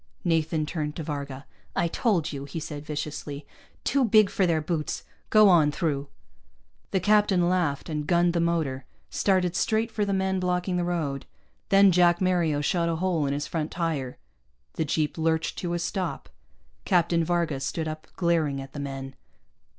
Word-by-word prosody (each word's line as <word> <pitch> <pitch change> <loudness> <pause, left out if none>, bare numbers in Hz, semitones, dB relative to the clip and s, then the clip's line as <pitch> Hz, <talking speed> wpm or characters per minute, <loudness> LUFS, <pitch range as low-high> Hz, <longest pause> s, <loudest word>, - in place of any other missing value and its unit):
Nathan 160 -1 +1
turned 150 -2 -3
to 165 - -4
Varga. 140 -2 -5 0.3
"I 170 - +2
told 175 - 0
you," 140 0 -5
he 140 +4 -5
said 150 -1 -7
viciously. 150 -1 -5 0.4
"Too 275 0 +2
big 215 -3 +5
for 190 - +2
their 165 -2 +2
boots. 155 -1 -3 0.3
Go 215 -1 +7
on 165 -6 +5
through." 145 -4 -2 0.8
The 190 - +1
captain 205 -2 +3
laughed 175 -6 0
and 150 -2 -3
gunned 175 0 +3
the 170 - +1
motor, 160 -6 0 0.3
started 185 -3 +1
straight 225 +1 +1
for 215 -1 -1
the 200 - -1
men 190 -1 0
blocking 180 0 0
the 175 - 0
road. 160 -6 -2 0.4
Then 195 0 +6
Jack 175 -1 +4
Mario 175 -5 +1
shot 170 +3 +1
a 165 - 0
hole 165 -4 0
in 140 - 0
his 145 +1 -2
front 160 -2 -3
tire. 155 -7 -3 0.6
The 160 - -1
jeep 155 +2 -1
lurched 160 0 0
to 175 -1 -2
a - - 0
stop. 175 +1 -3 0.5
Captain 170 - +2
Varga 170 -4 0
stood 155 +4 -3
up, 155 0 -6
glaring 165 -6 +1
at 135 0 -9
the 145 - -6
men. 135 -1 -5
165 Hz, 175 wpm, -26 LUFS, 150-180 Hz, 0.8 s, Go